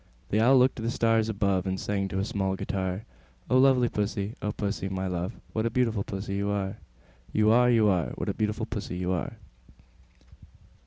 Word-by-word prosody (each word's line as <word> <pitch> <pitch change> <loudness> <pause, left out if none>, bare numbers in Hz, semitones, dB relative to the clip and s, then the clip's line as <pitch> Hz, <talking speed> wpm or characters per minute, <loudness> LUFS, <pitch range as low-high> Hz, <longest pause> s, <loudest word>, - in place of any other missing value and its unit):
The 105 - +3
Owl 130 +4 +6
looked 125 +1 +5
up - - -31
to - - -5
the 115 - -1
stars 115 -1 +2
above, 100 -3 0
And 95 0 -2
sang 100 -1 -1
to 95 - -4
a 95 - 0
small 95 -3 -1
guitar, 95 +1 -3 0.5
"O 130 - +5
lovely 130 -2 +5
Pussy, 105 -1 -2
O 105 - -1
Pussy, 100 -2 -3
my 95 0 -3
love, 90 -1 -2 0.2
What 110 +1 0
a - - +1
beautiful 115 -3 +1
Pussy 100 0 -4
you 100 0 -1
are, 100 -1 -2 0.5
You 110 0 +3
are, 125 +1 +5
You 115 -3 +4
are! 90 -4 +2
What - - -4
a - - 0
beautiful 110 +1 -1
Pussy 100 -5 -5
you 90 0 -1
are!" 90 -3 -2
105 Hz, 205 wpm, -27 LUFS, 95-115 Hz, 0.5 s, Owl